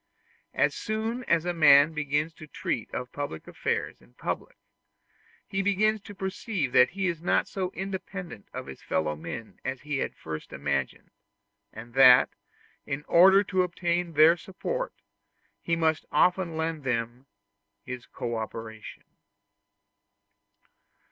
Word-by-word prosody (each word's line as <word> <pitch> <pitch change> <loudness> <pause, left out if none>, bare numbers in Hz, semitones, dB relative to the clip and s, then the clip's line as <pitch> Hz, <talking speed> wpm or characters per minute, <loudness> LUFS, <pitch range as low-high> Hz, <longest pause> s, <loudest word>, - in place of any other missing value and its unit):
As - - +3
soon 220 +3 -3
as 170 0 +2
a 175 - 0
man 150 -2 +6
begins 150 +1 -1
to 155 -1 -12
treat 120 -5 -3
of 125 0 -5
public 145 - -5
affairs - - -3
in - - -23
public, - - -4 0.9
he 195 -1 -2
begins 210 +2 +2
to 205 0 -11
perceive 190 - -3
that 125 0 +6
he 195 +1 -3
is 170 -3 -1
not 175 - +2
so 185 -2 -3
independent 190 - -6
of - - -6
his 65 -1 -10
fellow 75 -1 -1
men 110 +9 -8
as 130 -1 -4
he 145 -2 -2
had - - -1
at - - -36
first 80 -1 -7
imagined, - - -3 0.6
and 115 +2 -11
that, 130 -1 +7 0.6
in 140 +3 -4
order 190 +3 +7
to 185 -1 +1
obtain 175 -1 -1
their 155 +3 +7
support, - - -4 0.7
he 170 - 0
must 160 -1 +1
often 170 +1 +2
lend 160 -2 -2
them 120 +1 -2 0.6
his 125 -1 -7
co 120 -1 -4
operation. 110 0 -7
160 Hz, 140 wpm, -27 LUFS, 125-185 Hz, 0.9 s, that